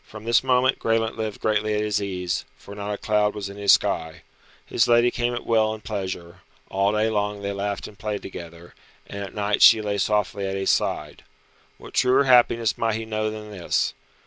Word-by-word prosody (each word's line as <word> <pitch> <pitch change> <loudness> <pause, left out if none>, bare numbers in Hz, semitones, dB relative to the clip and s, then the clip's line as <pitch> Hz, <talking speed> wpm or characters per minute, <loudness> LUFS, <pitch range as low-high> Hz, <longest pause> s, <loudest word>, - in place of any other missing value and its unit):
From 110 -1 -12
this 115 +1 +3
moment 130 +1 +2
Graelent 115 0 0
lived 110 -2 -5
greatly 110 0 0
at 105 - 0
his 105 -1 0
ease, 90 -5 -3
for 100 - -12
not 105 0 -5
a 105 - -3
cloud 105 0 +1
was 100 -1 -5
in 100 - -10
his 100 -1 +5
sky. 80 0 0 0.4
His - - +1
lady 120 +1 +4
came 120 0 -1
at 120 - -6
will 110 -1 +2
and 110 - -14
pleasure; 95 -4 -5 0.3
all 100 +1 +2
day 105 +1 +2
long 105 -1 -2
they 100 - -2
laughed 100 0 -3
and 105 - -15
played 105 -1 -4
together, 85 -2 -10 0.3
and 100 - -7
at 100 - -9
night 105 0 0
she 115 - +8
lay 105 -1 -2
softly 105 0 0
at 95 - -3
his 95 - +1
side. 75 -1 -2 0.5
What - - -13
truer 130 +2 +4
happiness 120 -3 +3
might 115 -1 +1
he 110 0 -4
know 110 0 -2
than 105 0 -8
this? 95 -4 -1
105 Hz, 205 wpm, -24 LUFS, 100-110 Hz, 0.5 s, she